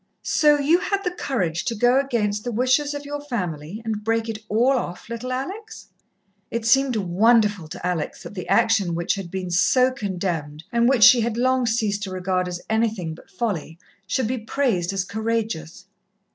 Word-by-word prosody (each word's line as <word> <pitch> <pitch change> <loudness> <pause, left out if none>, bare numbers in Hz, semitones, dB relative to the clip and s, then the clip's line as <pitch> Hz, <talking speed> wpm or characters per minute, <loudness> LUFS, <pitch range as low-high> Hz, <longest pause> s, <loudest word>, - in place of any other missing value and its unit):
"So 295 -1 +4
you 300 +5 +3
had 395 +2 -1
the 360 - -1
courage 180 - -2
to 230 - -1
go 245 +4 +4
against 215 -6 -1
the 245 - -3
wishes 255 +5 +1
of 290 0 -6
your 290 0 -5
family 185 - -4
and 215 -2 -3
break 225 +1 0
it 220 -1 -4
all 235 +5 +3
off, 235 -9 -3
little 235 +2 -5
Alex?" 385 - -6 0.6
It 230 -1 -3
seemed 270 +1 +3
wonderful 205 -1 +2
to 160 - -8
Alex 180 -4 -3
that - - -9
the 180 -3 -6
action 200 -7 +3
which 170 0 0
had 195 -3 -6
been 185 0 -4
so 250 +8 +4
condemned, 175 - -4
and 235 +1 +3
which 255 -5 +4
she 240 +2 +8
had 230 0 -1
long 255 0 +2
ceased 215 -3 0
to 200 - -4
regard 185 0 -1
as 175 0 -5
anything 220 -7 0
but 160 - -15
folly, 185 -6 -3 0.3
should 255 +5 0
be 250 +3 -2
praised 220 -6 0
as 195 -1 -2
courageous. 215 -6 -3
220 Hz, 185 wpm, -23 LUFS, 185-255 Hz, 0.6 s, she